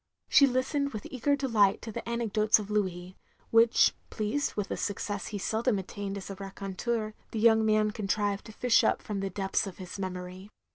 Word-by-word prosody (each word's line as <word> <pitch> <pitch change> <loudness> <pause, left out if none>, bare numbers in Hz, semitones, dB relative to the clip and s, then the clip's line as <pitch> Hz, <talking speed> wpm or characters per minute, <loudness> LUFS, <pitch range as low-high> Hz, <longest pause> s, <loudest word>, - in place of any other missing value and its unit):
She 280 - +7
listened 270 +2 0
with 215 - -6
eager 280 +3 +1
deKght 220 -8 +3
to 225 - -6
the - - -4
anecdotes 220 -2 +2
of 210 -1 -6
Louis; 185 -3 -2 0.3
which, 230 0 +5 0.2
pleased 220 +7 -2
with 205 -2 -3
a - - 0
success 205 0 -3
he 210 - -4
seldom 220 +3 0
attained 195 +1 -5
as 200 0 -7
a - - -6
raconteur, 200 +3 -3 0.2
the 225 - -4
young 220 0 +5
man 215 -1 +3
contrived 205 -1 -1
to - - -9
fish 235 +2 +3
up - - +1
from 205 -2 -4
the 195 0 -2
depths 195 +1 -1
of 190 - -8
his 185 +1 -8
memory. 185 +1 -6
210 Hz, 190 wpm, -29 LUFS, 195-230 Hz, 0.3 s, She